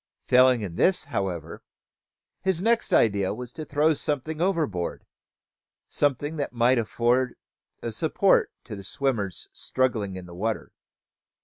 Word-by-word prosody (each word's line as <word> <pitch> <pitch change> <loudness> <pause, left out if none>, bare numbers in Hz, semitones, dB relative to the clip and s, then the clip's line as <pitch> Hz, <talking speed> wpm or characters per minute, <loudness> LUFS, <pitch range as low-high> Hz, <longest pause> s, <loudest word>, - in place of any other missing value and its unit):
Failing 125 -1 +5
in 90 -5 -5
this, 185 -1 +3
however, 90 - -4 0.8
his 190 -3 +1
next 230 +4 +1
idea 100 -3 +3
was 125 +1 -8
to 155 - -6
throw 150 +2 +2
something 150 +1 -3
overboard, 155 - -1 0.8
something 145 +2 0
that 140 -4 -3
might 120 +1 +3
afford 120 +3 +1 0.5
a 115 - -2
support 160 - +2
to 110 - -7
the 100 - -9
swimmers 105 - -2
struggling 110 -7 -1
in 95 -1 -7
the 85 - -11
water. 110 +5 -3
125 Hz, 130 wpm, -26 LUFS, 100-150 Hz, 0.8 s, Failing